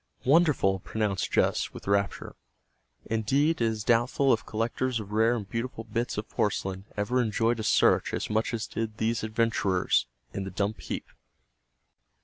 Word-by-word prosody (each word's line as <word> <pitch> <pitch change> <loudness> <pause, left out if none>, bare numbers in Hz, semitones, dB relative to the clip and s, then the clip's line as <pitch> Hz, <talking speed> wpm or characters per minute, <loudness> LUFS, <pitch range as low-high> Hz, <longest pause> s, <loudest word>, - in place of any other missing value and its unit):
"Wonderful!" 140 - +4
pronounced 100 -1 -2
Jess - - +1
with - - -9
rapture. 100 0 0 0.7
Indeed, 135 +8 +1
it - - +4
is 110 -2 -1
doubtful 120 +4 +3
if 110 -1 -1
collectors 115 +2 -1
of 105 -1 -8
rare 110 +3 +3
and 105 -5 -5
beautiful 115 +2 -4
bits 115 +1 -3
of 105 - -3
porcelain 95 -2 -2
ever 120 +5 +1
enjoyed 115 +1 +1
a - - -2
search - - +3
as - - -2
much 110 +1 0
as 115 -2 -2
did 110 -1 -4
these 115 +1 0
adventurers 110 - +1 0.3
in 100 - -3
the 95 - -5
dump 100 +3 -2
heap. - - -4
110 Hz, 155 wpm, -28 LUFS, 105-120 Hz, 0.7 s, Wonderful